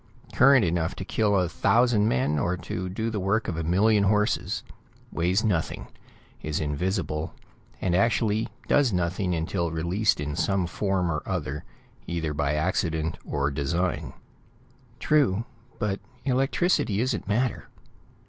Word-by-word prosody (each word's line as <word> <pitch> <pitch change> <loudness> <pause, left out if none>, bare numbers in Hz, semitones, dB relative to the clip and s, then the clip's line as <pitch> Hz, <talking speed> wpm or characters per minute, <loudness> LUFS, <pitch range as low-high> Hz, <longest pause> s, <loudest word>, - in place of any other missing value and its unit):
Current 135 -3 +6
enough 85 -1 0
to - - -6
kill 105 -2 +1
a 90 - +1
thousand 110 +5 +3
men, 70 - +1
or 90 +1 0
to 90 +2 -4
do 110 +5 -2
the 105 - -2
work 100 +4 0
of 85 - -2
a 80 - -2
million 100 +5 +3
horses, 105 +1 +1 0.5
weighs 90 +5 +1
nothing, 90 -8 -1 0.5
is 75 -1 -2
invisible, 80 +1 -2 0.4
and 90 - 0
actually 110 +1 +2 0.2
does 140 -5 +3
nothing 90 0 0
until 85 +1 -1
released 85 +6 +1
in 75 0 -3
some 95 +1 +1
form 90 -1 -1
or 75 -1 -2
other, 75 -6 -3 0.4
either 80 -3 -2
by 75 0 0
accident 80 -1 -1
or 70 0 -1
design." 85 +6 -1 0.9
"True, 120 -8 +2 0.3
but 100 -2 -1 0.3
electricity 135 - +1
isn't 120 -4 -1
matter. 120 +3 0
90 Hz, 135 wpm, -26 LUFS, 80-105 Hz, 0.9 s, Current